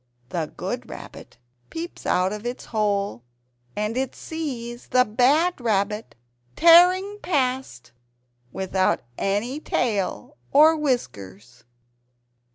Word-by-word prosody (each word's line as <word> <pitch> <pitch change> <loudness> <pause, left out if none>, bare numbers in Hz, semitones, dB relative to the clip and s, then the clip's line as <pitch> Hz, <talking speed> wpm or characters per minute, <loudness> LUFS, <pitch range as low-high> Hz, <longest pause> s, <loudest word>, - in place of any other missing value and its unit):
The 160 0 -3
good - - -4
Rabbit - - -11 0.3
peeps 335 +2 -7
out 185 +2 +2
of 210 0 -7
its 245 +1 -5
hole...... 205 - -1 0.5
and 210 +2 -2
it 260 0 -2
sees 250 -7 -6
the 250 0 +4
bad 275 +9 +2
Rabbit 210 -1 -1 0.4
tearing 365 +5 +6
past 260 - -2 0.6
without 190 +2 0 0.2
any 215 +8 -1
tail 245 +2 -2
or 310 +3 +6
whiskers! 120 - -4
240 Hz, 100 wpm, -24 LUFS, 200-295 Hz, 0.6 s, tearing